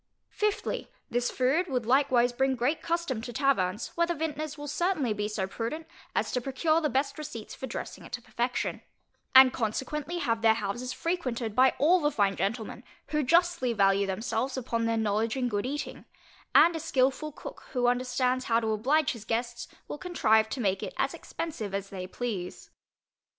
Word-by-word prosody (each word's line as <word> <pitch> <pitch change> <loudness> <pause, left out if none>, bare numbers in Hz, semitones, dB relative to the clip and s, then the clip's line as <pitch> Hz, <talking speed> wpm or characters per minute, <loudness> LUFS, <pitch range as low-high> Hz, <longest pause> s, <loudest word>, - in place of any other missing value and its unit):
Fifthly, 420 -1 -1 0.2
This 245 0 +1
food 275 +8 +1
would 250 -6 -1
likewise 250 -1 +3
bring 265 +1 +1
great 255 +6 0
custom 335 -9 -1
to 240 - -6
taverns, 225 -6 +1
where 340 0 +2
the 345 - -1
vintners 310 -1 -3
will 290 0 -6
certainly 295 - 0
be 210 0 -2
so 210 -2 -2
prudent 230 +11 -4 0.3
as - - 0
to 250 - 0
procure 310 +6 +1
the 300 - +1
best 275 +3 -1
receipts 265 -8 -7
for 265 - -6
dressing 235 - -6
it - - -12
to 245 - -3
perfection; 245 +1 -2 0.5
and 260 -1 +9
consequently 280 +9 -2
have 230 -9 0
their 220 -1 +5
houses 225 +4 -3
frequented 255 - -2
by 260 +1 +5
all 340 +6 +5
the 295 -3 +2
fine 200 -8 +1
gentlemen, 225 +3 -3 0.3
who 300 0 +1
justly 335 -3 +3
value 200 -1 +3
themselves 225 +6 -2
upon 230 -2 -1
their 230 0 +1
knowledge 220 +2 0
in 250 -1 +1
good 205 0 -1
eating; 290 +2 -5 0.5
and 340 0 +7
a - - -2
skilful 280 -1 +1
cook, - - -10
who 250 -2 +1
understands 250 +1 +1
how 230 -1 +3
to 220 -1 -1
oblige 265 +8 +2
his 230 -4 -8
guests, 235 +2 -2 0.2
will 295 - -6
contrive 220 -12 +2
to 260 - -4
make 195 -4 +1
it - - -5
as - - 0
expensive 220 -12 -5
as 195 0 -4
they 185 -2 -5
please. 195 -5 -5
250 Hz, 180 wpm, -29 LUFS, 225-295 Hz, 0.5 s, and